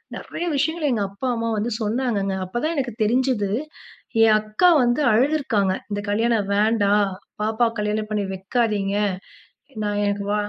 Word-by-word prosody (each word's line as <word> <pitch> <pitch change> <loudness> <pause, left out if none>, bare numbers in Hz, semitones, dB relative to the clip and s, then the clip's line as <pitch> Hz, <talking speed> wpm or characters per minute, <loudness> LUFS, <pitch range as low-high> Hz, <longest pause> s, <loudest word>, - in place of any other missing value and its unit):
நெறைய 345 - -5
விஷயங்கள் 315 +1 0
எங்க 215 -4 0
அப்பா, 200 +7 -5
அம்மா 230 0 -2
வந்து 230 +3 -1
சொன்னாங்கங்க. 215 -3 -1
அப்பதான் 240 - -2
எனக்கு 255 -4 -2
தெரிஞ்சுது 240 -2 +1 0.7
என் 220 -1 +6
அக்கா 215 +12 +3
வந்து 240 +4 +1
அழுதுருக்காங்க. 230 -6 +2 0.2
"இந்த 205 0 -2
கல்யாணம் 220 -1 +1
வேண்டாம் 205 -1 +3 0.3
பாப்பா, 220 +2 +1
கல்யாணம் 210 0 -1
பண்ணி 210 -1 0
வைக்காதீங்க" 200 0 -1 0.9
நான் 205 0 -1
எனக்கு 205 0 -1
வா 210 - +1
215 Hz, 135 wpm, -22 LUFS, 205-245 Hz, 0.9 s, என்